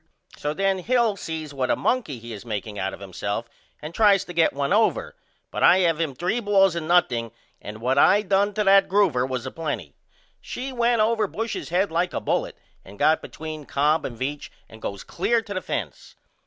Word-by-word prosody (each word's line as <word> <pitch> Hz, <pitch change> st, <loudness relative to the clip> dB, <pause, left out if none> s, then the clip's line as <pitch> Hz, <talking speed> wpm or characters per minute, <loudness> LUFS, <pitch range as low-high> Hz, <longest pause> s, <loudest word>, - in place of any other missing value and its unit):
So 150 Hz, +1 st, -3 dB
then 195 Hz, +1 st, +1 dB
Hill 235 Hz, +1 st, +2 dB
sees 160 Hz, -5 st, -6 dB
what 130 Hz, -2 st, -1 dB
a -, -, +3 dB
monkey 235 Hz, -, -1 dB
he 115 Hz, 0 st, -9 dB
is 105 Hz, -, -8 dB
makeing 105 Hz, -2 st, -5 dB
out 95 Hz, 0 st, -1 dB
of -, -, -10 dB
himself 100 Hz, +4 st, -4 dB, 0.4 s
and 155 Hz, +2 st, -6 dB
tries 200 Hz, -1 st, +4 dB
to 175 Hz, -, -8 dB
get 165 Hz, -1 st, +3 dB
one 140 Hz, +5 st, -1 dB
over, 220 Hz, +2 st, +1 dB, 0.4 s
but -, -, -4 dB
I -, -, +7 dB
have 165 Hz, -2 st, +2 dB
him 150 Hz, -5 st, -2 dB
3 180 Hz, -, -1 dB
balls 195 Hz, -4 st, +3 dB
and 165 Hz, -2 st, -3 dB
nothing 125 Hz, -10 st, +2 dB, 0.3 s
and 105 Hz, +2 st, -8 dB
what 130 Hz, +3 st, +2 dB
I 205 Hz, +7 st, +5 dB
done 200 Hz, +1 st, +1 dB
to 210 Hz, -, +1 dB
that 195 Hz, 0 st, +5 dB
groover 170 Hz, -11 st, +2 dB
was 130 Hz, -2 st, -3 dB
a -, -, -5 dB
plenty. 120 Hz, -, -4 dB, 0.5 s
She 260 Hz, +1 st, -6 dB
went 235 Hz, -2 st, +2 dB
over 220 Hz, -1 st, +2 dB
Bush's 225 Hz, +3 st, -4 dB
head 185 Hz, +3 st, +1 dB
like 175 Hz, +2 st, 0 dB
a -, -, 0 dB
bullet -, -, -2 dB, 0.3 s
and 100 Hz, +2 st, -13 dB
got 155 Hz, +2 st, +3 dB
between 155 Hz, -2 st, -8 dB
Cobb 150 Hz, +3 st, +2 dB
and 120 Hz, -, -6 dB
Veach 140 Hz, +4 st, -4 dB, 0.2 s
and 110 Hz, 0 st, -14 dB
goes 100 Hz, -1 st, -5 dB
clear 235 Hz, -1 st, 0 dB
to 210 Hz, -2 st, -7 dB
the 185 Hz, -, -3 dB
fence. -, -, -5 dB
165 Hz, 210 wpm, -24 LUFS, 130-200 Hz, 0.5 s, I